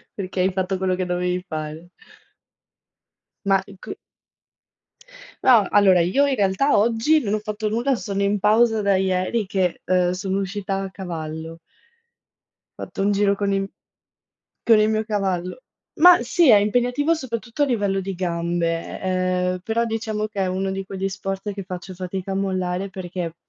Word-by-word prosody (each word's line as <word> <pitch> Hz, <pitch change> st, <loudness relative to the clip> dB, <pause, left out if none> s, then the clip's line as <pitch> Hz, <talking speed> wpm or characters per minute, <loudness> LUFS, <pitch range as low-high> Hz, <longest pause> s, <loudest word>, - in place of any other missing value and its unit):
Perché 190 Hz, -1 st, -5 dB
hai 185 Hz, +1 st, +2 dB
fatto 190 Hz, 0 st, -1 dB
quello 185 Hz, 0 st, 0 dB
che 185 Hz, 0 st, -2 dB
dovevi 180 Hz, 0 st, -1 dB
fare. 155 Hz, +2 st, -6 dB, 1.6 s
Ma, 195 Hz, -1 st, +3 dB
uhm, 200 Hz, -1 st, -13 dB
c -, -, -7 dB, 1.5 s
No, 230 Hz, -6 st, +6 dB
allora 195 Hz, -3 st, +5 dB
io 230 Hz, +12 st, +2 dB
in 275 Hz, -, +1 dB
realtà 205 Hz, +5 st, +2 dB
oggi 230 Hz, +8 st, +3 dB
non 205 Hz, -2 st, -1 dB
ho 215 Hz, -, +1 dB
fatto 215 Hz, 0 st, -4 dB
nulla, 240 Hz, +5 st, +1 dB
sono 200 Hz, -3 st, -3 dB
in 200 Hz, +1 st, +1 dB
pausa 220 Hz, +2 st, +3 dB
da 200 Hz, -1 st, +3 dB
ieri 190 Hz, +3 st, 0 dB
che, 185 Hz, -2 st, -1 dB
uhm, 180 Hz, -1 st, +2 dB
sono 190 Hz, +1 st, -2 dB
uscita 195 Hz, 0 st, -3 dB
a 190 Hz, -, -6 dB
cavallo. 165 Hz, -3 st, -6 dB, 1.2 s
Fatto -, -, -5 dB
un 200 Hz, +1 st, +2 dB
giro 200 Hz, 0 st, +2 dB
con 200 Hz, 0 st, -1 dB
il 195 Hz, 0 st, -1 dB, 0.9 s
con 225 Hz, -2 st, +5 dB
il 215 Hz, 0 st, +3 dB
mio 220 Hz, 0 st, 0 dB
cavallo. 195 Hz, -1 st, -2 dB, 0.4 s
Ma 355 Hz, -3 st, +8 dB
sì, 295 Hz, +6 st, +3 dB
è 215 Hz, -, +9 dB
impegnativo 245 Hz, +9 st, +1 dB
soprattutto 250 Hz, -2 st, -3 dB
a -, -, +4 dB
livello 205 Hz, -7 st, 0 dB
di 195 Hz, 0 st, -4 dB
gambe, 170 Hz, -1 st, -2 dB
e 190 Hz, -, -2 dB, 0.4 s
ehm, 185 Hz, -, -5 dB
però 230 Hz, +1 st, 0 dB
diciamo 220 Hz, -1 st, -2 dB
che 205 Hz, -2 st, -4 dB
è -, -, +1 dB
uno 190 Hz, +1 st, -2 dB
di 195 Hz, 0 st, -4 dB
quegli 195 Hz, 0 st, -3 dB
sport 195 Hz, +1 st, -4 dB
che 195 Hz, -1 st, -6 dB
faccio 185 Hz, 0 st, -7 dB
fatica 185 Hz, +1 st, -5 dB
a -, -, -3 dB
mollare 185 Hz, -1 st, -2 dB
perché, 180 Hz, -3 st, -5 dB
195 Hz, 165 wpm, -22 LUFS, 185-215 Hz, 1.6 s, è